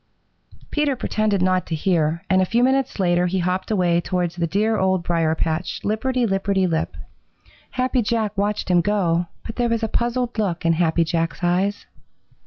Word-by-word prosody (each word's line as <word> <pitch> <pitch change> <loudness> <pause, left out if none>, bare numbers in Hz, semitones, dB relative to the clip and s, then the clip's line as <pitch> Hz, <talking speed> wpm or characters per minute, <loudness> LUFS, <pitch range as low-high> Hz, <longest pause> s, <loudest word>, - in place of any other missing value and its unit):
Peter 295 -2 +1
pretended 215 -5 0
not 185 -1 +1
to 165 - -2
hear, 165 -1 0
and 190 0 +3
a - - +3
few 235 +6 +1
minutes 265 +1 +1
later 175 -1 +2
he 185 +2 -1
hopped 185 +1 -1
away 175 -5 +2
towards 175 -1 -2
the 170 -1 -1
dear 215 +6 +1
Old 190 -2 +1
Briar 165 -2 +1
patch, 160 +2 -2
lipperty 245 +4 0
lipperty 195 -1 +1
lip. 160 -2 -2 0.7
Happy 255 0 0
Jack 215 -2 -1
watched 205 0 -1
him 175 -1 +5
go, 175 -3 +1 0.2
and 225 - -6
there 240 -1 +1
was 230 -1 0
a - - +1
puzzled 240 +1 -1
look 180 -5 -1
in 165 - +4
Happy 165 0 +2
Jack's 165 -1 -2
eyes. 185 +4 0
190 Hz, 180 wpm, -22 LUFS, 175-220 Hz, 0.7 s, him